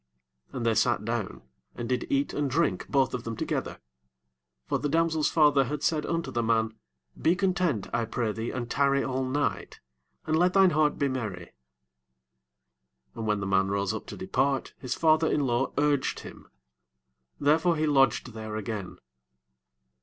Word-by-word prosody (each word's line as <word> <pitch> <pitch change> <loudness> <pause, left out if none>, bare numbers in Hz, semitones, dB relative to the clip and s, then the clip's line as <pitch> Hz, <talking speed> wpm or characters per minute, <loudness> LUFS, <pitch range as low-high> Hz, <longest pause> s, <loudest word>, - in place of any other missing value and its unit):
6 - - -16
And 120 -2 -3
they 115 - +3
sat 105 - +1
down, 115 - -3 0.3
and 120 - -5
did 125 0 -1
eat 140 +1 +1
and 145 -1 -1
drink 130 - 0
both 135 -3 +2
of 125 -2 -3
them 115 -1 -5
together: - - -3 0.9
for - - -1
the 145 - -2
damsel's 160 0 +2
father 145 -4 +4
had 150 +4 -4
said 155 -1 0
unto 170 0 -2
the 120 - 0
man, 110 -1 +1 0.5
Be 165 +3 +3
content, 180 - 0
I 115 -1 +1
pray 115 0 -2
thee, 115 +2 -4
and 120 -2 -4
tarry 140 +2 +2
all 130 0 -1
night, 140 +3 -2 0.5
and 155 - +1
let 180 +1 +3
thine 195 -2 +5
heart 150 -1 +2
be 140 - +1
merry. 110 -10 -5 1.6
7 - - -42
And 110 - -5
when 105 -1 +1
the - - -2
man 95 0 +2
rose 100 0 -1
up - - -6
to - - -8
depart, 135 +8 -1
his 130 -2 -3
father 160 0 +3
in 145 - +1
law 120 +1 0
urged 145 -2 +1
him: - - -12 0.9
therefore 160 +4 +3
he 155 0 0
lodged 135 -4 +2
there 110 -1 -6
again. 105 -3 -5
130 Hz, 175 wpm, -27 LUFS, 115-150 Hz, 1.6 s, thine